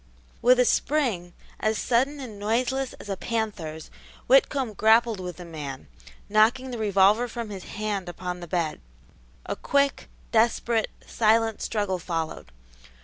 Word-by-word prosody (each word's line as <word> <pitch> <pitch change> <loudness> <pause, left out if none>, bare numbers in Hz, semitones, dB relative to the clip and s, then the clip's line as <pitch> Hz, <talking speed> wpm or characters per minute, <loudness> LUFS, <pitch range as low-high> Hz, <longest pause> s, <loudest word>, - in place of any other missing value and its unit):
With 250 +1 +5
a 250 - +5
spring, 235 - +1 0.3
as 215 0 +1
sudden 265 +6 +1
and 225 -7 -8
noiseless 250 +5 0
as - - -12
a 195 - -2
panther's, 190 -8 -4 0.3
Whitcomb 280 - +3
grappled 220 +1 +4
with 180 -3 -6
the 180 - -9
man, 145 - -7 0.4
knocking 235 +5 +3
the 240 - -5
revolver 205 +3 +4
from 230 -2 -6
his 190 -3 -7
hand 205 -4 -3
upon 180 +1 -5
the 175 - -8
bed. 165 -2 -2 0.6
A - - -3
quick, 280 -1 0 0.2
desperate, 230 0 +2 0.2
silent 225 0 +2
struggle 205 -4 -1
followed. 165 - -4
215 Hz, 140 wpm, -26 LUFS, 180-240 Hz, 0.6 s, With